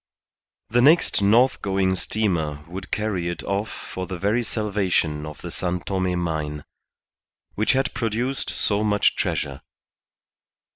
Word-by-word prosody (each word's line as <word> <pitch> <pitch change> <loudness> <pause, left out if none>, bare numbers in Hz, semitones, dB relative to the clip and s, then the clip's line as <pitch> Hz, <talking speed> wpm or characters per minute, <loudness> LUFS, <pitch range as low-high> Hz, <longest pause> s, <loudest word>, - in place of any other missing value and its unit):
The 120 +2 +4
next 150 -3 +5
north 115 +6 +4
going 95 -1 +1
steamer 85 -9 -1
would 95 +2 -7
carry 100 -5 -1
it 85 - -5
off 100 +2 -1
for 95 -1 -6
the 95 - -4
very 105 +6 +1
salvation 95 -8 0
of 75 - -9
the - - -5
San 90 0 -2
Tome 95 -2 -1
mine, 75 -4 -2 0.9
which 105 - +2
had 135 +1 0
produced 120 +3 -1
so 105 0 0
much 105 -1 +3
treasure. 70 +1 -2
100 Hz, 135 wpm, -24 LUFS, 85-110 Hz, 0.9 s, next